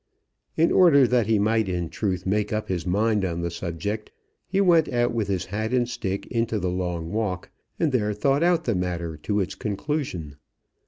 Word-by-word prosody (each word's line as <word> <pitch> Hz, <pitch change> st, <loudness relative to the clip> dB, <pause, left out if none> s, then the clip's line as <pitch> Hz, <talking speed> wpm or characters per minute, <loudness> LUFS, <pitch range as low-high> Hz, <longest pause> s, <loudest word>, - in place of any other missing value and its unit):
In 165 Hz, +1 st, +4 dB
order 155 Hz, -7 st, +6 dB
that 120 Hz, -3 st, +2 dB
he 110 Hz, -1 st, +3 dB
might 110 Hz, 0 st, +1 dB
in 90 Hz, -2 st, -2 dB
truth 90 Hz, 0 st, -2 dB
make 105 Hz, +2 st, 0 dB
up 110 Hz, 0 st, -2 dB
his 90 Hz, -1 st, -2 dB
mind 105 Hz, +2 st, +2 dB
on 85 Hz, -2 st, -2 dB
the 85 Hz, 0 st, -2 dB
subject, 90 Hz, +5 st, -4 dB, 0.4 s
he 190 Hz, +2 st, 0 dB
went 170 Hz, -5 st, +4 dB
out 120 Hz, -1 st, +1 dB
with 110 Hz, -4 st, -1 dB
his 95 Hz, -4 st, -1 dB
hat 110 Hz, +5 st, -3 dB
and 120 Hz, -1 st, +2 dB
stick 100 Hz, -5 st, -3 dB
into 115 Hz, -2 st, 0 dB
the 90 Hz, -3 st, -1 dB
long 90 Hz, -2 st, -3 dB
walk, 105 Hz, -5 st, -2 dB, 0.3 s
and 160 Hz, -3 st, +2 dB
there 105 Hz, -5 st, +1 dB
thought 135 Hz, +8 st, +1 dB
out 170 Hz, -1 st, +3 dB
the 120 Hz, -, 0 dB
matter 90 Hz, -3 st, -2 dB
to 105 Hz, +7 st, -1 dB
its 95 Hz, 0 st, -1 dB
conclusion. 100 Hz, -, -3 dB
105 Hz, 195 wpm, -25 LUFS, 90-120 Hz, 0.4 s, order